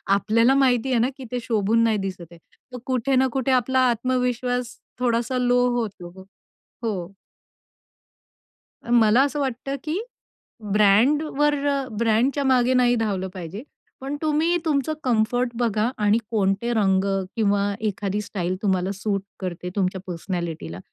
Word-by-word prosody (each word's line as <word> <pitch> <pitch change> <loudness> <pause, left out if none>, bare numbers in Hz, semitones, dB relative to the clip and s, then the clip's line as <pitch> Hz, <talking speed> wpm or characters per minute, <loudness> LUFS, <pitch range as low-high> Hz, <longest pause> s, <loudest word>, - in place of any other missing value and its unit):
आपल्याला 230 +5 +3
माहितीये 255 -2 +2
ना, 245 +3 +2
की 265 - -8
ते 250 - -1
शोभून 225 0 +1
नाही 225 -2 +2
दिसतय, 175 -3 -9
तर 250 +8 -15
कुठे 260 +1 0
ना 260 +1 +4
कुठे 265 0 0
आपला 260 +1 +2
आत्मविश्वास 250 0 -1 0.2
थोडासा 240 +1 0
लो 245 0 +2 0.2
होतो. 190 -5 -6 0.6
हो. 195 -5 -3 1.8
मला 235 +1 +5
असं 285 +1 -2
वाटतं, 270 0 -3
की 315 +6 -2 0.7
ब्रँड 215 +9 +4
वर 295 0 +3
अ, 275 -2 0
ब्रँडच्या 235 +6 +1
मागे 255 -1 +3
नाही 245 -1 +3
धावलं 200 -5 -1
पाहिजे. 185 +4 -7 0.4
पण 275 +2 -4
तुम्ही 315 +3 +2
तुमचं 300 0 0
कम्फर्ट 245 +1 +1
बघा 225 -1 +1
आणि 210 +1 +3
कोणते 205 +2 0
रंग 195 -4 +2 0.3
किंवा 205 -3 +2 0.2
एखादी 205 -1 -2
स्टाईल 185 -3 -3
तुम्हाला 190 -2 0
सूट 200 0 -2 0.2
करते 180 -1 -5
तुमच्या 190 -2 -1
पर्सनॅलिटीला 170 - -5
230 Hz, 130 wpm, -23 LUFS, 200-255 Hz, 1.8 s, मला